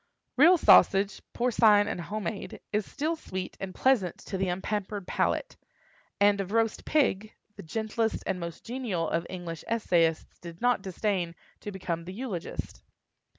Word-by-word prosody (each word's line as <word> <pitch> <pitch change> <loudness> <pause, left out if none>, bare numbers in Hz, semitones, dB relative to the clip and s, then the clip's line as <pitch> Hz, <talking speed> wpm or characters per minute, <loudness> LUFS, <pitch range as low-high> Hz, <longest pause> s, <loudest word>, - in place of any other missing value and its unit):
Real 340 +7 +7
sausage, 195 -9 +5
porcine 220 -4 +4
and 180 - -3
home 210 +5 -4
made, 195 +3 -5
is 210 -1 0
still 310 +4 -1
sweet 190 - -6
and 190 -1 -6
pleasant 230 -10 +2
to 200 - -5
the 190 0 0
unpampered 195 +2 -3
palate; - - -1 0.6
and 200 0 +4
of 195 0 -6
roast 225 -1 +1
pig, 215 -9 +1 0.2
the - - -9
gentlest 220 +5 -2
and 190 -1 -1
most 170 -1 -7
genial 230 -9 -2
of 165 +1 -1
English 175 -3 -6
essayists 170 -8 +1
did 170 -1 -10
not 245 -3 +2
disdain 190 -2 -2 0.2
to 205 - -6
become 170 -3 -4
the 185 - -7
eulogist. 210 -6 -5
200 Hz, 150 wpm, -28 LUFS, 180-225 Hz, 0.6 s, Real